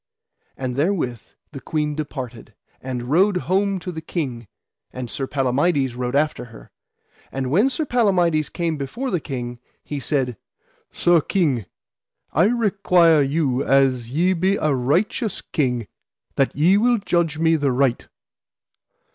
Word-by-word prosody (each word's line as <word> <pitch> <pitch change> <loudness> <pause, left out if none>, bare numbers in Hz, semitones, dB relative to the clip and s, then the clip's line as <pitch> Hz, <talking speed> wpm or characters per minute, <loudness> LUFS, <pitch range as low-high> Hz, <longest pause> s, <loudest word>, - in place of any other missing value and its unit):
And 130 -1 -4
therewith 145 - 0 0.3
the 135 -3 -8
queen 150 0 -1
departed, 135 -6 -6 0.3
and 125 -2 -4
rode 190 +4 +4
home 195 +2 0
to 180 - -5
the 160 -2 -6
king, 130 - -4 0.4
and 125 -2 -6
Sir 135 - -3
Palamides 135 0 +1
rode 125 +1 -3
after 150 -2 0
her. 115 -2 -15 0.6
And 130 -1 -3
when 205 - +4
Sir 300 +4 -2
Palamides 180 - +2
came 165 -3 -2
before 230 - -4
the 180 - +1
king, 120 -4 -6 0.2
he 145 - -5
said: 130 -5 -1 0.5
Sir 175 -2 +3
King, 140 - 0 0.7
I 165 +5 +4
require 195 -8 +3
you 140 -2 0
as 130 -3 +2
ye 175 +8 +2
be 185 +3 +1
a 155 -6 +1
righteous 175 - 0
king, 125 -6 -1 0.5
that 135 - +1
ye 175 +7 +4
will 240 +3 +3
judge 170 -6 0
me 165 0 +3
the 145 -3 +1
right. 130 -1 +1
150 Hz, 140 wpm, -22 LUFS, 130-180 Hz, 0.7 s, rode